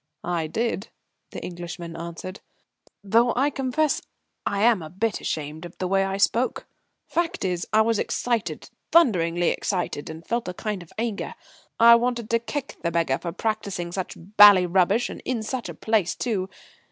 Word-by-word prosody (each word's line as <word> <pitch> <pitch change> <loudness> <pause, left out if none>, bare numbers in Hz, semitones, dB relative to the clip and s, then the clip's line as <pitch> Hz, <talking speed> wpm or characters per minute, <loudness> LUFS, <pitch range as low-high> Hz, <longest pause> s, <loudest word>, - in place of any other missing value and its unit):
"I 170 -2 -1
did," 220 +3 -2 0.4
the - - -8
Englishman 175 -1 -7
answered, 170 +3 -7 0.6
"though 230 +4 +3
I 275 +4 +2
confess 275 +3 0 0.5
I'm 205 0 +3
a 155 - -7
bit 210 +6 -2
ashamed 155 +1 -4
of 175 0 -10
the 185 - -2
way 195 +1 +2
I 195 0 -2
spoke. 235 +5 +1 0.4
Fact 345 - -1
is, 180 -2 -1
I 215 - +5
was 225 -1 +2
excited, 235 -3 -2 0.2
thunderingly 175 - +4
excited, 175 -6 -2
and 160 +1 -9
felt 235 +2 -2
a 180 - -4
kind 210 -2 -3
of 175 - -14
anger. 225 -2 -3 0.4
I 235 +1 +9
wanted 240 -2 -2
to 230 - +3
kick 275 +4 -5
the 170 - 0
beggar 165 -5 +1
for 170 - -4
practising 200 -3 -3
such 185 0 -4
bally 200 0 +7
rubbish, 185 +6 +2
and - - -8
in 240 -4 -2
such 245 +2 -4
a - - -7
place 215 -6 +1
too. 195 -6 -2
200 Hz, 165 wpm, -25 LUFS, 175-230 Hz, 0.6 s, I